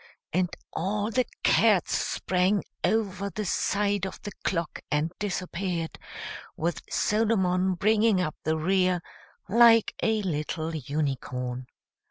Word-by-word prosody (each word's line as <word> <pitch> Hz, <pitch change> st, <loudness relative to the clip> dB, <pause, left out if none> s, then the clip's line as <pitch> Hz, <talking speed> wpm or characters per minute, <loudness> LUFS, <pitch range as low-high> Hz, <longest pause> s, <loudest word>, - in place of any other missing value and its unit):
and 180 Hz, +1 st, +2 dB, 0.2 s
all 205 Hz, +5 st, -1 dB
the 250 Hz, 0 st, +1 dB, 0.2 s
cats 210 Hz, -6 st, +4 dB
sprang 185 Hz, +2 st, +1 dB, 0.2 s
over 200 Hz, 0 st, 0 dB
the 210 Hz, +2 st, -4 dB
side 200 Hz, +1 st, 0 dB
of -, -, -8 dB
the 205 Hz, -, -5 dB
clock, 170 Hz, -3 st, -1 dB
and 150 Hz, +2 st, 0 dB
disappeared, 185 Hz, -4 st, -3 dB, 0.6 s
with 170 Hz, +1 st, -1 dB
Solomon 190 Hz, -4 st, +2 dB
bringing 210 Hz, +1 st, +3 dB
up 155 Hz, -4 st, -1 dB
the 160 Hz, +1 st, +1 dB
rear, 180 Hz, +1 st, +2 dB, 0.4 s
like 230 Hz, +2 st, +6 dB
a 220 Hz, -1 st, +1 dB
little 160 Hz, -1 st, -2 dB
unicorn. 130 Hz, -3 st, -3 dB
185 Hz, 115 wpm, -27 LUFS, 165-210 Hz, 0.6 s, like